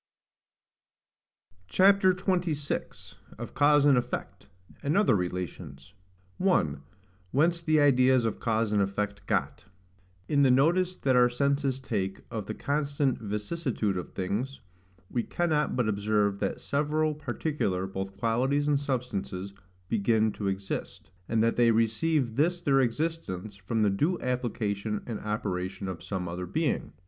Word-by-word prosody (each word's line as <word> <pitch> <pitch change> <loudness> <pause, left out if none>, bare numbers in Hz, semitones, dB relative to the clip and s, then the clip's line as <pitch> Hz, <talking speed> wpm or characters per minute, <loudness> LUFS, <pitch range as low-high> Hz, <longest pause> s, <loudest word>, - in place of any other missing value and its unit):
CHAPTER 195 - +5
XXVI. 180 -6 -2 0.2
OF - - -7
CAUSE 145 0 +4
AND 140 -4 +6
EFFECT, 120 0 -6 0.3
AND 145 +6 0
OTHER 205 - +4
RELATIONS. 90 -6 -5 0.5
1. 80 - +2 0.5
Whence 165 - +2
the 155 -2 +3
Ideas 130 -3 +4
of 110 - -2
cause 110 -2 0
and 105 -1 +3
effect 105 +1 -2
got. - - -1 0.6
In 145 -1 +2
the 135 - +5
notice 175 +8 +3
that 130 -6 +1
our 125 0 +6
senses 140 +1 0
take 100 -7 -3
of 110 -4 -4
the 110 - -4
constant 140 -2 0
vicissitude 105 - -2
of 90 - -5
things, 110 +9 -3 0.5
we 120 - +1
cannot 155 +1 0
but 125 -3 +1
observe 105 -1 +1
that 100 - -2
several 150 +2 0
particular, 135 - -2
both 95 0 -5
qualities 130 +6 +1
and 145 -1 +3
substances, 100 -8 -3 0.3
begin 110 +1 +2
to 100 -1 -4
exist; 95 -1 -4 0.2
and 115 -1 +2
that 115 - +1
they 120 -1 +5
receive 115 +3 +1
this 175 +4 +2
their 140 -5 +3
existence 120 - -2
from 105 +3 -1
the 105 - +3
due 155 - 0
application 110 -4 -2
and 115 -3 -4
operation 95 -2 -3
of 90 -3 -5
some 95 -3 -4
other 90 +2 -5
being. - - -1
120 Hz, 135 wpm, -28 LUFS, 100-145 Hz, 0.6 s, AND